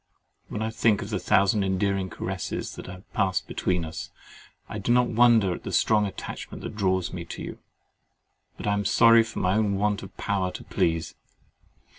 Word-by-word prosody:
When 110 - -4
I 110 - -2
think 110 -1 +2
of 100 - -8
the 105 - 0
thousand 100 +3 +3
endearing 95 0 0
caresses - - -4
that - - -9
have 90 +1 -10
passed 95 -2 +1
between 90 -2 -1
us, 80 - -6 0.6
I 105 - -5
do 105 - -1
not 125 0 +4
wonder 115 -5 +5
at - - -7
the - - -6
strong 105 -2 +3
attachment 95 - -7
that - - -6
draws 95 -3 0
me 90 -2 -4
to - - -7
you; - - -7 1.0
but - - -7
I 105 - +2
am 100 0 0
sorry 115 +3 +6
for 115 - -5
my 90 0 +1
own 105 -1 +2
want 105 0 0
of 95 - -11
power 95 -4 0
to - - -7
please. 80 -1 -1
100 Hz, 190 wpm, -26 LUFS, 95-110 Hz, 1.0 s, sorry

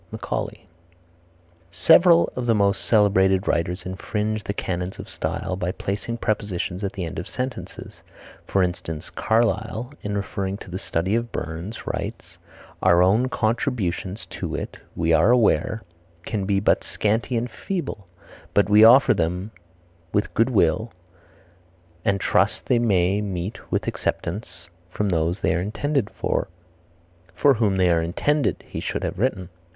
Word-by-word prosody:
Macaulay. - - -4 1.0
Several 165 - +5
of 125 -1 -3
the 115 - +4
most 100 -1 +2
celebrated 95 -3 +3
writers 90 +3 -1
infringe 105 +3 -2
the - - -3
canons 90 -2 -3
of - - -8
style 90 - -3
by 90 -1 -2
placing 105 +5 -4
prepositions 100 -4 -2
at 100 - -2
the 95 -3 -4
end 80 - -5
of 90 - -6
sentences. 130 0 -6 0.5
For 95 - +2
instance 85 -2 -4
Carlyle, 110 +3 0
in 105 0 -2
referring 100 -1 -3
to 95 - -11
the 95 - -4
Study 90 +3 -1
of 115 +1 -1
Burns, 85 +7 -5
writes: - - -5 0.4
"Our 90 -1 +5
own 110 +8 +3
contributions 110 -5 -1
to - - -3
it, - - -5 0.2
we 80 0 +1
are 100 - +5
aware, 110 -3 +3 0.4
can 105 -4 -2
be 100 0 +2
but 100 - +2
scanty 115 +4 0
and 120 +2 -1
feeble; 125 - -5 0.5
but 100 -2 +4
we 105 +1 +8
offer 130 +3 +8
them 90 +2 -2 0.6
with 105 - 0
good 115 +3 +3
will, 110 0 +2 1.1
and 100 0 +1
trust - - +1
they 120 - +3
may 100 -3 +2
meet 95 0 -5
with - - 0
acceptance 95 -1 -4 0.2
from 100 +2 -1
those 85 +1 0
they - - +2
are 85 - 0
intended 130 +5 -1
for." - - -2 0.9
"for 140 +7 +5
whom 110 -5 +1
they 90 -2 +4
are 85 -1 +3
intended," 140 - 0
he - - -5
should - - -3
have - - -3
written. 100 -7 -1
100 Hz, 150 wpm, -23 LUFS, 90-115 Hz, 1.1 s, we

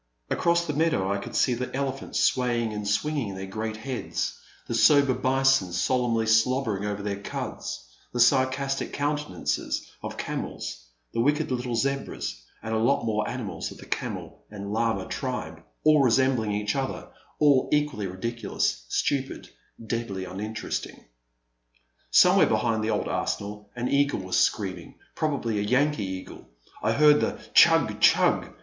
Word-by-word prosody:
Across 170 0 +2
the 150 - -2
meadow 145 -11 +1
I 100 - -2
could - - -8
see 125 - +3
the 125 +1 -4
elephants 135 0 -2
swaying 120 -3 +1
and 105 -1 -4
swinging 115 -1 -1
their 95 0 -5
great 110 +3 -4
heads, 130 +2 -4 0.2
the - - -4
sober 140 -3 +5
bison 130 -5 +2
solemnly 115 +5 +1
slobbering 110 -2 +2
over 105 -1 -3
their 100 -1 -3
cuds, - - -5 0.2
the 120 - -4
sarcastic 130 +3 +2
countenances 145 +1 -2
of - - -6
camels, - - -5 0.3
the - - +1
wicked 150 +3 +1
little 125 -1 -2
zebras, 135 - -2 0.2
and 110 - -3
a 110 - +1
lot 115 +1 +2
more 105 -1 0
animals - - -4
of - - -11
the - - -12
camel - - -5
and 100 -1 -6
llama 110 -4 0
tribe, 80 -12 -4 0.2
all 155 -1 +6
resembling 130 -3 +2
each 105 0 -1
other, 135 -1 -3 0.3
all 145 -3 +4
equally 150 -9 0
ridiculous, 95 - -2
stupid, 135 - -1 0.4
deadly 110 -5 -3
uninteresting. 105 +4 -5 1.0
Somewhere - - +6
behind 110 -2 +1
the 110 - -1
old - - 0
arsenal 105 0 -3
an 120 +1 -2
eagle 140 -5 +2
was 95 0 -3
screaming, 95 -4 -1 0.2
probably 135 -9 -1
a - - 0
Yankee 130 +3 +1
eagle; 95 0 -8 0.3
I - - +1
heard 150 0 +5
the - - 0 0.2
tchug! - - +5
tchug - - +4
115 Hz, 145 wpm, -26 LUFS, 105-135 Hz, 1.0 s, all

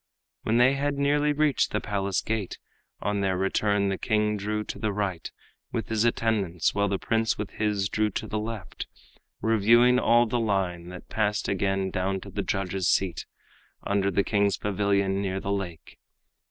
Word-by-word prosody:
When 110 +2 +1
they 125 +2 +5
had 140 +1 -1
nearly 145 +1 +2
reached 150 -1 +2
the - - -1
palace 100 -2 -1
gate 110 -4 -3 0.4
On 105 0 -1
their 95 -2 +1
return, 100 +1 +1
the 95 - -2
king 105 -2 +1
drew 105 +1 -2
to - - -7
the 110 -2 0
right 100 -4 -3 0.4
With 115 -4 -3
his 110 0 +1
attendants, 105 -7 +1
while 100 0 +1
the 100 0 0
prince 115 +2 0
with 105 -2 -4
his 105 -2 0
Drew 110 +1 0
to - - -4
the 110 - -3
left, 110 -3 -6 0.6
reviewing 115 +3 +5
all 120 0 +4
the 120 +1 -1
line 95 -5 -1
That 90 -1 -10
passed 105 -1 0
again 95 -1 0
down 95 +1 -1
to - - -10
the - - -2
judges' 95 -1 -1
seat, 95 -3 0 0.6
Under 100 -1 +1
the 100 +1 +1
king's 100 -2 +1
pavilion 100 -1 0
near 95 -1 -2
the 100 - -3
lake. 90 -5 -6
100 Hz, 175 wpm, -26 LUFS, 95-110 Hz, 0.6 s, they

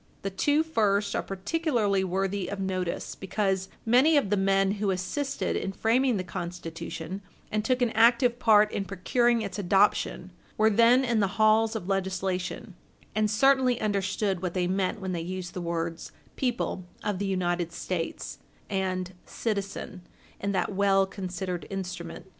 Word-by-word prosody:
The 195 - -2
two 290 +11 +2
first 205 -9 +1
are - - +1
particularly 205 - 0
worthy 190 +1 -1
of 200 +1 -5
notice, 185 -2 -2
because 190 -1 -1 0.2
many 260 +7 +5
of 205 -9 +1
the - - +4
men 195 0 +2
who 205 - +1
assisted 265 +10 -2
in 195 - -2
framing 240 +3 +2
the 185 - -2
Constitution, 175 0 -6 0.3
and 215 0 0
took 250 +2 +1
an 235 - +1
active 235 +2 +4
part 215 -3 +5
in 195 - -2
procuring 235 +5 +1
its 200 -1 -5
adoption, 200 +2 +2 0.3
were 220 +1 +4
then 235 +4 +5
in 235 -3 +1
the 200 -1 0
halls 220 +1 +4
of 185 -5 -4
legislation, 190 -1 -2 0.4
and 215 0 +1
certainly 255 +2 +3
understood 200 -2 0
what 180 -1 -3
they 180 -1 +1
meant 190 +3 0
when 190 -1 -4
they 170 -2 -2
used 180 +1 -5
the 180 - -4
words 170 -1 -3 0.2
"people 245 -7 -1 0.2
of 205 -3 -1
the 200 - -1
United 175 -2 -1
States" 170 -1 -4 0.3
and 185 -1 -1
"citizen" 200 -4 -4 0.4
in 200 - -1
that 195 - -1
well 195 0 +3
considered 185 -2 -5
instrument. 180 -3 -6
195 Hz, 155 wpm, -27 LUFS, 185-220 Hz, 0.4 s, many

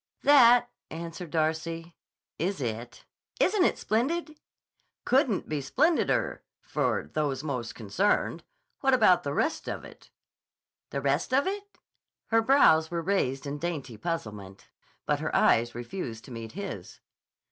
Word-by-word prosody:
"That," 245 -4 +6 0.2
answered 165 +1 -7
Darcy, 165 +1 -2 0.4
"is 185 +3 -1
it. 120 -1 -5 0.3
Isn't 385 0 +3
it - - +1
splendid!" 305 +8 -1 0.7
"Couldn't 255 -5 +2
be 150 - -2
splendider—for 315 - 0
those 145 -3 -1
most 125 -6 -4
concerned. 120 - 0 0.4
What 270 -1 +4
about 180 -8 +5
the 145 -3 -3
rest - - -1
of - - -5
it?" - - -15 0.8
"The 140 - -3
rest 140 - +1
of 275 - +3
it?" 405 +1 -5 0.5
Her 225 0 +4
brows 190 - +5
were 170 -1 -3
raised 150 -8 0
in 145 +1 -4
dainty 145 -8 -4
puzzlement, 105 - -6 0.4
but - - +1
her - - -2
eyes 120 +1 +3
refused 120 -2 -6
to 135 - -12
meet 115 -2 -7
his. 200 +3 -7
165 Hz, 130 wpm, -28 LUFS, -, 0.8 s, That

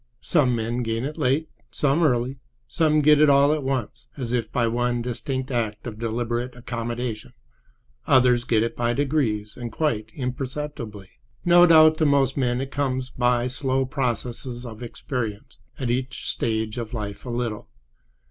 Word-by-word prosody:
Some 135 -7 +2
men 115 +2 -2
gain 115 +1 -2
it 150 +2 -4
late, 145 +3 +1 0.2
some 140 +6 +1
early; 130 -3 +1 0.3
some 155 -2 +2
get 150 0 +5
it 150 - +6
all 140 +1 +5
at 155 - -1
once, 125 -3 -3
as 125 -4 -4
if 120 -2 -1
by 120 - +1
one 120 +1 0
distinct 130 +2 -3
act 110 -4 -2
of 110 -3 -6
deliberate 120 +2 -2
accommodation; 120 -1 -4 0.7
others 125 -3 +4
get 115 -3 +2
it 115 - -3
by 120 0 0
degrees 130 -7 0
and 120 -2 -6
quite 110 -9 -1
imperceptibly. 125 -5 -5 0.4
No 175 0 +7
doubt 155 -1 +7
to 155 - +4
most 140 -2 +3
men 125 -2 0
it 135 0 -5
comes 130 -2 -2
by 125 -1 +1
slow 130 +1 0
processes 125 -1 -3
of 110 -2 -9
experience—at 120 +1 -5
each 130 +1 -3
stage 110 0 -1
of 115 0 -5
life 105 -2 -5
a 125 - -7
little. 120 -3 -3
125 Hz, 155 wpm, -24 LUFS, 115-135 Hz, 0.7 s, No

